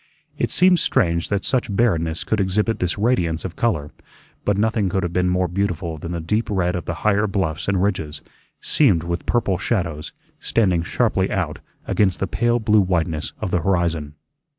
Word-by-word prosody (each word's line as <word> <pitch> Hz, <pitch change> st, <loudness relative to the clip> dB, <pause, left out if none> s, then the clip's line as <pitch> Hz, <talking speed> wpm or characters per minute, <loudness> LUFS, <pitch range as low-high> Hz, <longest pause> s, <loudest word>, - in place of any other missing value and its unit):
It -, -, +1 dB
seemed 180 Hz, -1 st, +4 dB
strange 85 Hz, 0 st, +1 dB
that 100 Hz, -1 st, -1 dB
such 125 Hz, -5 st, 0 dB
barrenness 85 Hz, -8 st, +1 dB
could 110 Hz, -, -1 dB
exhibit 105 Hz, +4 st, +1 dB
this 90 Hz, -1 st, -1 dB
radiance 95 Hz, -8 st, 0 dB
of 90 Hz, -, -5 dB
color, 75 Hz, -11 st, -1 dB, 0.5 s
but 105 Hz, -1 st, +1 dB
nothing 110 Hz, -2 st, +1 dB
could 95 Hz, +1 st, -1 dB
have 85 Hz, -1 st, -3 dB
been 90 Hz, 0 st, +1 dB
more 90 Hz, 0 st, +1 dB
beautiful 85 Hz, -3 st, -2 dB
than 85 Hz, -, -6 dB
the 85 Hz, -, -3 dB
deep 105 Hz, +8 st, -1 dB
red 90 Hz, -3 st, 0 dB
of 90 Hz, -, -4 dB
the 85 Hz, -, -3 dB
higher 105 Hz, 0 st, +3 dB
bluffs 90 Hz, -6 st, -2 dB
and 95 Hz, -1 st, +1 dB
ridges, 80 Hz, -7 st, -2 dB, 0.4 s
seamed 100 Hz, -, +3 dB
with 85 Hz, 0 st, -4 dB
purple 100 Hz, -7 st, +1 dB
shadows, 85 Hz, -9 st, -2 dB, 0.3 s
standing 95 Hz, -7 st, +1 dB
sharply 85 Hz, -, 0 dB
out -, -, -2 dB, 0.3 s
against 95 Hz, -3 st, +1 dB
the -, -, 0 dB
pale 120 Hz, +7 st, +1 dB
blue 110 Hz, -2 st, +3 dB
whiteness 85 Hz, -4 st, -1 dB
of 90 Hz, -, -2 dB
the 90 Hz, -, +1 dB
horizon. 85 Hz, -6 st, 0 dB
90 Hz, 180 wpm, -21 LUFS, 85-105 Hz, 0.5 s, seemed